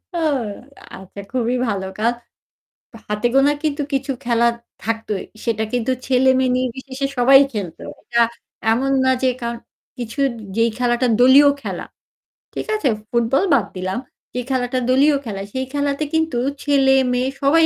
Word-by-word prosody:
ও - - 0 0.8
আচ্ছা 190 +1 -12
খুবই 250 -1 0
ভালো 200 -3 -2
কাজ। 230 +2 +2 1.0
হাতে 210 +2 -1
গোনা 275 +2 +5
কিন্তু 300 -1 -1
কিছু 275 0 0
খেলা 235 -1 +2 0.4
থাকতোই। 225 -3 -2 0.2
সেটা 220 -1 0
কিন্তু 245 0 0 0.2
ছেলে-মেয়ে 260 0 +3
নির্বিশেষে 260 +2 -3
সবাই 265 +2 +7
খেলতো। 195 -7 -5 0.2
এটা 235 - 0 0.5
এমন 270 +4 0
না 260 - +4
যে 260 - +3
কারণ 235 0 -3 0.4
কিছু 240 +3 -5 0.4
যেই 230 0 +3
খেলাটা 245 0 +1
দলীয় 265 +3 +7
খেলা, - - -4 0.7
ঠিক - - -5
আছে? 365 -11 +1 0.2
ফুটবল 235 +6 +2
বাদ 250 -7 +3
দিলাম। 185 +3 -3 0.3
যে 250 - -2
খেলাটা 255 -1 0
দলীয় 280 +3 +4
খেলা, 200 -4 -5
সেই 260 0 -2
খেলাতে 285 +1 -1
কিন্তু 320 -5 +1 0.3
ছেলে, 275 -2 +3 0.2
মেয়ে 250 +1 0
সবাই 320 +4 +5
255 Hz, 145 wpm, -20 LUFS, 230-275 Hz, 1.0 s, সবাই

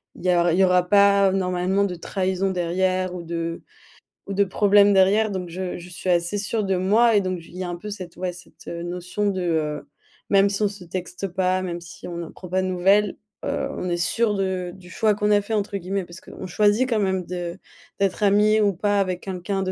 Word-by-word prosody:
il - - -11
y - - +3
a 175 -1 +3
il 175 - +1
y - - +6
aura 180 -1 +2
pas 200 -1 +5
normalement 185 +1 +1
de 185 -3 -3
trahison 190 +2 -1
derrière 185 +1 0
ou 175 - -6
de 165 0 -4 0.7
ou 200 - -3
de 200 +1 +3
problèmes 205 +1 +4
derrière, 200 +3 +4
donc 185 -3 -4
je 180 +1 -4
je 180 0 -10
suis 180 +1 -5
assez 175 +3 +1
sûre 215 +2 -1
de 195 -1 0
moi 215 +5 +4
et 205 - +5
donc 185 -1 -2
il 170 - -15
y 185 - -4
a 180 - -4
un 175 - -3
peu 210 +5 -8
cette, 185 -4 -8
ouais, 180 0 -3
cette 180 0 -16
notion 180 +4 -3
de, 190 -2 -2
heu, 155 -3 -1 0.4
même 200 0 +5
si 200 +1 -1
on - - +4
se 200 -2 -8
texte 180 +2 -5
pas, 185 0 0
même 175 -2 -4
si 175 +1 -11
on 175 - -6
ne 170 -2 -5
prend 180 - -11
pas 185 +1 +1
de - - -1
nouvelles, 195 +3 +2 0.3
heu, - - -1
on 180 - -3
est 175 - 0
sûre 210 +5 +1
de 190 -2 -2
du 185 -1 -14
choix 215 +2 +2
qu'on 210 0 0
a 205 -1 +4
fait 220 - -5
entre 205 -1 -1
guillemets 190 +1 -3
parce 175 +1 -12
qu'on - - -9
choisit 210 +7 +2
quand 225 -3 +1
même 190 -2 0
de 175 0 -5 0.4
d'être 200 +1 0
ami 210 +2 +4
ou 205 -1 +3
pas 205 +3 +1
avec 185 -2 -1
quelqu'un, 190 +1 -3
de 185 -1 -1
185 Hz, 235 wpm, -23 LUFS, 180-200 Hz, 0.7 s, y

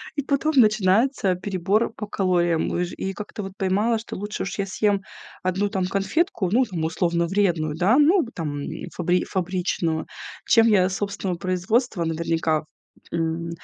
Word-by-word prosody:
И 285 - 0
потом 285 +3 0
начинается 215 -1 +3
перебор 195 +4 0
по 210 - -5
калориям. 175 -4 +1
Уж 175 0 -1
и 195 0 -3
как-то 210 +1 -7
вот 195 0 -7
поймала, 205 +5 +1
что 225 - -8
лучше 205 +2 -4
уж 200 - -5
я 200 - +1
съем 200 +1 +1 0.4
1 190 +2 0
там 190 -3 -1
конфетку, 200 - 0
ну, 250 +4 +4
там, 175 -8 -4
условно 170 +1 0
вредную, 170 -6 +1
да, 200 - +3
ну, 320 +2 +5
там, 150 -4 -4 0.3
фабри 180 +1 +1
фабричную, 180 -3 -1 0.4
чем 225 -1 +6
я 195 -5 +4
собственного 195 -2 -3
производства, 185 +2 0
наверняка, 160 -1 0 0.5
м, 165 0 -2
190 Hz, 150 wpm, -24 LUFS, 175-210 Hz, 0.5 s, чем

